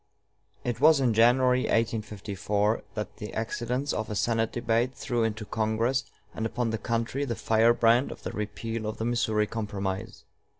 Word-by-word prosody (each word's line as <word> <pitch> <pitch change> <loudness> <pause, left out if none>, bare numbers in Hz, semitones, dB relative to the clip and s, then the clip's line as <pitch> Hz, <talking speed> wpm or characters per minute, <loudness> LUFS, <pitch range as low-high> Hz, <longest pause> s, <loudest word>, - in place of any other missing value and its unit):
It 120 0 -3
was 155 -1 +7
in 125 -4 +2
January, 125 +3 +5
1854, 105 -1 0
that 105 -1 -5
the 105 - -7
accidents 125 +5 -2
of 110 - -3
a 105 - -3
Senate 115 +2 +1
debate 120 +2 0
threw 120 -2 -1
into 110 -1 -2
Congress 115 +6 0 0.3
and 110 - -4
upon 115 0 -1
the 110 - -2
country 115 +5 -1
the 120 -4 -2
firebrand 115 +3 +3
of - - -10
the - - -4
repeal 110 +1 -4
of 110 - -4
the 110 - -2
Missouri 110 -3 +1
Compromise. 100 -3 -4
115 Hz, 160 wpm, -28 LUFS, 110-120 Hz, 0.3 s, was